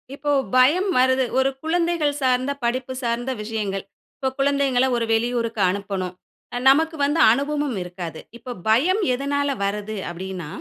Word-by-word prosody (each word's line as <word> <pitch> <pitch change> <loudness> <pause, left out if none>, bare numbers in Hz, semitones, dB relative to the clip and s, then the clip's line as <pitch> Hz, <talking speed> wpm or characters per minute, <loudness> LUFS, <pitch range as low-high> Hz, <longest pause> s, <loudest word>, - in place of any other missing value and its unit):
இப்போ 290 +1 -2 0.2
பயம் 310 +10 +4
வருது, 260 +1 +3
ஒரு 265 +1 +3
குழந்தைகள் 325 -3 0
சார்ந்த 255 +1 +1
படிப்பு 255 +2 -1
சார்ந்த 240 +2 -1
விஷயங்கள். 210 -3 -3 0.3
இப்ப 265 -2 -1
குழந்தைகள்ல 275 -2 +2
ஒரு 230 - 0
வெளியூருக்கு 230 -1 0
அனுப்பணும். 190 -2 -3 0.5
நமக்கு 320 +4 +3
வந்து 295 +3 0
அனுபவமும் 285 -1 -1
இருக்காது. 175 -2 -7 0.2
இப்போ 245 +2 -8 0.2
பயம் 335 - +3
எதனால 285 +2 -1 0.2
வருது 210 +2 -3
அப்டீன்னா, 180 -1 -6
255 Hz, 130 wpm, -22 LUFS, 215-285 Hz, 0.5 s, பயம்